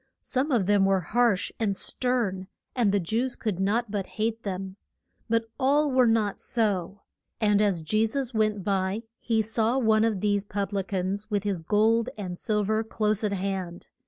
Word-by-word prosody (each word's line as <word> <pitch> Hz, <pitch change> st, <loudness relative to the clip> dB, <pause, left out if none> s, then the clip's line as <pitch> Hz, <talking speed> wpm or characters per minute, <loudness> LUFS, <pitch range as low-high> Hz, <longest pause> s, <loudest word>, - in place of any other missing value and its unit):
Some 270 Hz, +3 st, -1 dB
of 230 Hz, -7 st, +2 dB
them 205 Hz, 0 st, +4 dB
were 195 Hz, -1 st, +2 dB
harsh 230 Hz, +2 st, +1 dB
and 200 Hz, -4 st, 0 dB
stern, 225 Hz, -7 st, -1 dB, 0.3 s
and 235 Hz, -6 st, +3 dB
the 200 Hz, -, +2 dB
Jews 230 Hz, +8 st, -1 dB
could 210 Hz, -6 st, -3 dB
not 210 Hz, +3 st, 0 dB
but 200 Hz, -3 st, -2 dB
hate 225 Hz, +1 st, -1 dB
them. 190 Hz, -2 st, -5 dB, 0.5 s
But 230 Hz, 0 st, +2 dB
all 285 Hz, +2 st, +3 dB
were 255 Hz, -1 st, +4 dB
not 220 Hz, -3 st, +1 dB
so. 205 Hz, -4 st, -1 dB, 0.4 s
And 210 Hz, -2 st, +3 dB
as 195 Hz, -6 st, +1 dB
Je 215 Hz, +7 st, +2 dB
sus 260 Hz, +2 st, -2 dB
went 215 Hz, -2 st, +1 dB
by 195 Hz, +2 st, -1 dB, 0.2 s
he 225 Hz, -1 st, +1 dB
saw 225 Hz, +3 st, 0 dB
one 220 Hz, -4 st, +3 dB
of 220 Hz, -4 st, +1 dB
these 205 Hz, -1 st, +1 dB
pub 200 Hz, -1 st, -3 dB
li 200 Hz, -, +1 dB
cans 195 Hz, +2 st, -3 dB
with 205 Hz, -2 st, 0 dB
his 200 Hz, -5 st, -2 dB
gold 220 Hz, +6 st, +2 dB
and 185 Hz, -4 st, -5 dB
sil 210 Hz, -2 st, 0 dB
ver 220 Hz, +2 st, +1 dB
close 215 Hz, -1 st, -1 dB
at 210 Hz, -, +1 dB
hand. 190 Hz, -2 st, -4 dB
210 Hz, 185 wpm, -27 LUFS, 195-225 Hz, 0.5 s, them